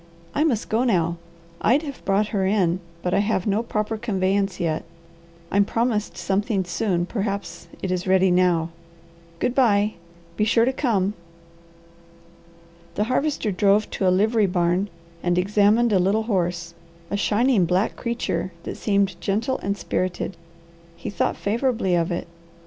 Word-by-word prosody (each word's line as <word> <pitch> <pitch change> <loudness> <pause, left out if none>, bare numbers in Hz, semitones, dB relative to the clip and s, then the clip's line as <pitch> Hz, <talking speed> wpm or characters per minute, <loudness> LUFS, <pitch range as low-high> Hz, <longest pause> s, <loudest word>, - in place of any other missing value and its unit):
I 295 - +2
must 250 -9 0
go 225 +3 +1
now. 170 -8 +1 0.4
I'd 270 +8 +3
have 280 -3 -7
brought 200 +2 +2
her 200 -3 0
in, 190 -3 +2 0.2
but 180 - 0
I - - +3
have 205 -2 0
no 205 +1 +1
proper 220 -1 -2
conveyance 195 -2 0
yet. 160 -3 -1 0.7
I'm 200 +1 +4
promised 225 0 -1
something 200 0 0
soon, 175 0 0
perhaps 200 -4 -4 0.2
it 190 - -1
is 185 0 -2
ready 190 0 +4
now. 175 -2 +3 0.7
Good 245 - 0
bye! 215 -5 +3 0.4
Be - - +2
sure 230 +1 +4
to 260 - +1
come!" 210 -8 +1 1.8
The 210 - +1
Harvester 275 -6 0
drove 200 +2 +2
to 190 - 0
a - - +6
livery 210 +3 +3
barn 180 +2 +1 0.3
and 175 0 +1
examined 210 +4 +3
a 190 - +4
little 200 +5 +2
horse, 175 -5 -1 0.4
a - - 0
shining 210 0 +2
black 185 +5 +1
creature 235 -5 -2
that - - -6
seemed 200 -3 0
gentle 225 +7 0
and 200 +1 -2
spirited. 185 0 -2 0.6
He 170 - -6
thought - - 0
favourably 225 -3 0
of 170 0 +1
it. 170 - -3
200 Hz, 150 wpm, -23 LUFS, 185-220 Hz, 1.8 s, a